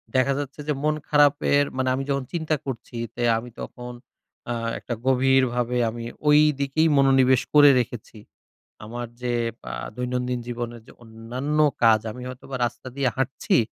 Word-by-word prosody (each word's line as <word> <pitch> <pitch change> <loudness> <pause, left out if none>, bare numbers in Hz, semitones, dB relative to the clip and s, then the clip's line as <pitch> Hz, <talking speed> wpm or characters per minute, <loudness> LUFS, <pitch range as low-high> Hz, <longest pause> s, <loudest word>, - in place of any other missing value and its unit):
দেখা 130 +1 +3
যাচ্ছে 140 0 -6
যে 150 - +1
মন 155 0 +2
খারাপের 145 -1 +4
মানে 130 0 +1
আমি 135 - -2
যখন 140 -1 0
চিন্তা 160 -2 0
করছি, 125 -2 -6 0.2
তে 120 - -3
আমি 120 +2 -6
তখন 125 0 -8 0.6
আ - - 0 0.3
একটা 120 - -5
গভীরভাবে, 130 -2 +2
আমি 115 +1 -7 0.2
ওই 150 0 +7 0.2
দিকেই 140 +4 +2
মনোনিবেশ 135 -2 +4
করে 145 -1 +8
রেখেছি। 120 -2 -5 0.7
আমার 120 +2 -6
যে, 125 -1 -1 0.4
আ - - -6 0.2
দৈনন্দিন 125 0 -2
জীবনের 120 -1 -5
যে - - -13
অন্যান্য 120 +6 -4 0.3
কাজ, 110 -1 +6
আমি 125 - -9
হয়তোবা 130 +1 -8
রাস্তা 120 - -6
দিয়ে 140 -2 +1
হাঁটছি। 135 0 0
130 Hz, 155 wpm, -24 LUFS, 120-140 Hz, 0.7 s, করে